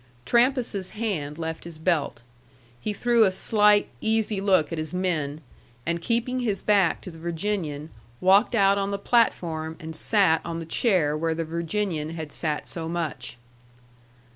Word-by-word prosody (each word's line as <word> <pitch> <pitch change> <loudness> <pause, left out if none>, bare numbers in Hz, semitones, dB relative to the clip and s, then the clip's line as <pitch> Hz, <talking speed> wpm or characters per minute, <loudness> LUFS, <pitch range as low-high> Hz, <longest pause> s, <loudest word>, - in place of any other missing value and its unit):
Trampas's 240 -6 +1
hand 155 -10 -2
left 160 -1 -5
his 170 -2 -9
belt. 160 -5 0 0.6
He 215 - -2
threw 235 +2 +3
a 200 - +5
slight, 210 +2 +3
easy 220 -2 0
look 190 -6 +3
at 165 - -3
his 155 +2 -4
men, 160 -5 -1 0.4
and 170 0 -1
keeping 240 +4 0
his 220 -5 -1
back 200 -5 +3
to 180 - -8
the 165 - -13
Virginian, 165 -3 -3 0.3
walked 195 +6 +4
out 200 -2 +4
on 195 0 -1
the 200 - -2
platform 165 -8 0
and 160 -1 -7
sat 185 -3 +3
on 170 -1 -4
the 165 - -5
chair 165 -5 +1
where 160 +1 -1
the 165 0 -2
Virginian 165 0 -2
had 160 -3 -6
sat 150 -1 -3
so 165 -1 -5
much. 155 -8 -4
175 Hz, 160 wpm, -25 LUFS, 160-210 Hz, 0.6 s, a